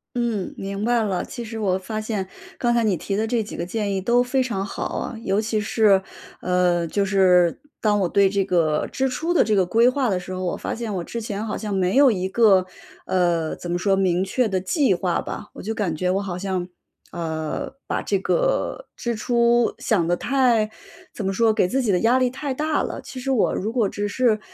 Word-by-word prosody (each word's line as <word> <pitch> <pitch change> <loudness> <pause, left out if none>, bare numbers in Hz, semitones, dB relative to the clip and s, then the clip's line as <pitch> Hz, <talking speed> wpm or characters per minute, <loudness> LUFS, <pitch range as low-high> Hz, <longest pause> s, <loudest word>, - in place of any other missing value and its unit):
嗯， 235 -6 -1
明 200 +2 -4
白 240 0 +2
了。 190 -4 -1
其 240 - -7
实 225 0 -7
我 195 -4 +1
发 215 +3 -4
现， 215 -3 -3 0.3
刚 240 - +2
才 235 -1 +2
你 210 -4 +2
提 195 +4 -3
的 215 +2 0
这 230 0 0
几 210 - -7
个 170 - -3
建 205 +2 -2
议 - - 0
都 235 +6 +3
非 255 +1 +1
常 230 -6 -2
好 200 - -5 0.2
啊。 240 - -5
尤 195 0 +1
其 220 0 -1
是， 210 -2 +3 0.4
呃， 180 -1 +2
就 200 +5 0
是 185 -3 +3 0.2
当 210 -2 +2
我 185 - +2
对 195 +2 +3
这 195 0 0
个 165 -5 +1
支 265 0 0
出 325 +7 -1
的 350 - +5
这 215 - +1
个 190 -2 +3
规 230 +7 +4
划 255 -1 0
的 185 - 0
时 180 +1 -9
候， 185 0 -4
我 175 - -1
发 - - -4
现 225 -2 -4
我 180 -3 -2
之 235 - -5
前 215 -2 -4
好 220 - -3
像 210 -2 -4
没 185 0 +1
有 275 -1 +7
一 190 -3 -2
个 200 -3 +5 0.4
呃， 170 -3 +1
怎 175 - -6
么 175 - +1
说， 195 +1 +2
明 185 -2 +1
确 230 +5 0
的 190 -3 -1
计 260 - +2
划 180 -1 0
吧。 - - -6
我 - - -10
就 220 +3 -2
感 195 -7 -1
觉 180 +3 0
我 195 +2 0
好 185 -3 -4
像， 185 -1 -2 0.4
呃， 160 -2 -4
把 - - -2
这 200 - 0
个 - - 0
支 235 -1 -3
出 235 +1 +2
想 180 -7 +1
得 175 - +2
太 240 -1 +2 0.4
怎 210 - -5
么 195 - 0
说， 225 +3 +3
给 215 -4 +2
自 265 +8 0
己 230 -5 +1
的 180 - +2
压 240 +3 +4
力 255 -1 +2
太 270 +2 -4
大 305 +3 0
了。 - - -5
其 260 - -9
实 270 +2 -2
我 250 -5 +2
如 215 +4 -3
果 230 -5 +2
只 205 0 -3
是 225 0 +2
205 Hz, 250 characters per minute, -23 LUFS, 185-235 Hz, 0.4 s, 有